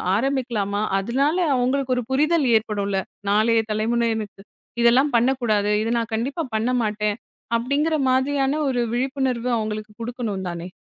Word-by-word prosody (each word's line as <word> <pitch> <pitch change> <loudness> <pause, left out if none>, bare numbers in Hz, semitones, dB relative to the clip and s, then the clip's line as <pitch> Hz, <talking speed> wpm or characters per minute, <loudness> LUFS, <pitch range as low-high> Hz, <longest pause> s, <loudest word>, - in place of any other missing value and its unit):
ஆரம்பிக்கலாமா? 230 -5 -1 0.2
அதுனால 275 - 0 0.2
அவுங்களுக்கு 255 +1 +1
ஒரு 250 - -1
புரிதல் 305 +3 +2
ஏற்படும்ல. 200 -3 -2 0.3
நாளைய 225 +2 +3
தலைமுறைக்கு 220 -2 -1 0.4
இதெல்லாம் 250 +4 +4
பண்ணக்கூடாது. 230 -4 +1
இத 225 - -2
நான் 230 0 -4
கண்டிப்பா 275 +9 -2
பண்ண 225 +3 +1
மாட்டேன். 210 -1 -1 0.4
அப்டிங்கிற 285 +7 0
மாதிரியான 270 +2 +1
ஒரு 250 -2 0
விழிப்புணர்வு 255 -1 -1
அவுங்களுக்கு 215 -1 -4
குடுக்கணும் 230 -5 -4
தானே! 170 0 -6
235 Hz, 120 wpm, -23 LUFS, 215-265 Hz, 0.4 s, இதெல்லாம்